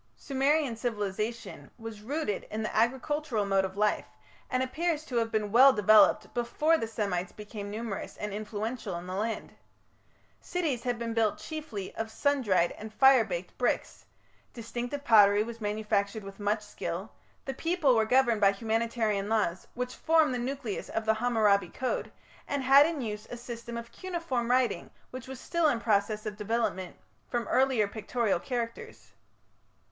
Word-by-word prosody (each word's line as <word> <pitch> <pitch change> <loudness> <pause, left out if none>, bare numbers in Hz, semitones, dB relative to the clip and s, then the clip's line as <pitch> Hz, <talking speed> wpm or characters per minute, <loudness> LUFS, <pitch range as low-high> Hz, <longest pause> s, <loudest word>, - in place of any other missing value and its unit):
Sumerian 275 -1 +1
civilization 220 0 -4
was 225 -2 -8
rooted 255 -3 -3
in 220 +1 -3
the 215 - -4
agricultural 255 0 0
mode 195 -1 +2
of 190 +1 -7
life, 210 0 +1 0.4
and 255 0 +1
appears 310 +3 -1
to 250 - -3
have 225 -1 +1
been 210 -2 -1
well 260 +5 +8
developed 215 0 +5
before 295 +7 +2
the 225 -8 -1
Semites 200 -5 -2
became 210 -1 -8
numerous 215 -1 -5
and 210 -1 -4
influential 215 0 -4
in 170 +1 -6
the 185 - -6
land. 220 +4 -3 0.9
Cities 315 -9 -2
had 245 0 -1
been 230 -1 -3
built 225 -2 +1
chiefly 300 -12 -6
of 225 0 -3
sun 285 +4 +1
dried 185 -7 +2
and 215 0 -7
fire 265 +1 +6
baked 180 -3 -5
bricks; 250 - -1 0.5
distinctive 245 +4 -5
pottery 205 -4 +6
was 230 0 -8
manufactured 210 0 -1
with 195 +1 -10
much 210 +1 0
skill; - - -5 0.3
the 270 - -3
people 325 -3 +2
were 220 - +4
governed 235 -1 +3
by 200 -1 +6
humanitarian 220 -1 -1
laws, 205 -5 0
which 250 0 -3
formed 320 -4 +3
the 250 - -2
nucleus 250 -3 -4
of 225 - -2
the 220 - +4
Hammurabi 215 -5 +2
code, 255 - -3 0.4
and 285 -2 -2
had 275 +3 +7
in 325 -4 -3
use 210 -3 -5
a 245 - -6
system 235 -1 -7
of 235 0 -8
cuneiform 335 -10 -3
writing 255 0 +1 0.2
which 255 -1 -8
was 265 -1 -7
still 340 +2 +1
in 245 -6 +1
process 215 -1 +1
of 210 -1 -4
development 210 -4 -2 0.3
from 240 -2 -2
earlier 260 -5 +3
pictorial 220 -1 -1
characters. 235 +1 -5
230 Hz, 160 wpm, -29 LUFS, 210-255 Hz, 0.9 s, well